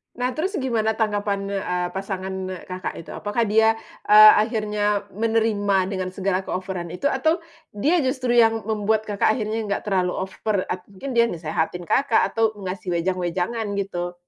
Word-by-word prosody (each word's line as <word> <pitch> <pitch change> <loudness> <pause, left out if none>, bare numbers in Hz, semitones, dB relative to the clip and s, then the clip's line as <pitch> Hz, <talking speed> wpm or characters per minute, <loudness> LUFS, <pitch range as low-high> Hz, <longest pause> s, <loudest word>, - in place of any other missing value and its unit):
Nah, 250 +1 -1
terus 375 +6 -1
gimana 220 -4 0
tanggapan, 205 -2 -1
eee, 180 -3 -1
pasangan, 190 0 -4
eee, 185 -2 -6
Kakak 185 0 -4
itu? - - -15
Apakah 210 +1 -2
dia, 220 +1 +5 0.3
eee, 215 +1 +10
akhirnya 210 -2 -1
menerima 205 -3 +1
dengan 185 -2 -3
segala 190 0 -1
keoveran 180 -2 -4
itu 280 +10 0
atau 315 +6 +1 0.3
dia 295 +12 +2
justru 255 -1 -1
yang 225 -1 +4
membuat 215 0 -1
Kakak 205 +1 +2
akhirnya 220 -2 -2
enggak 200 - -2
terlalu 185 -3 0 0.2
over, 200 0 -2
at 180 0 -4
mungkin 235 +6 -6
dia 235 - +6
nasehatin 170 -2 -2
Kakak 280 +1 +3
atau 225 -1 +1
ngasih 185 0 -4
wejang-wejangan, 180 +5 -1
gitu? 180 -3 -3
205 Hz, 155 wpm, -23 LUFS, 185-225 Hz, 0.3 s, eee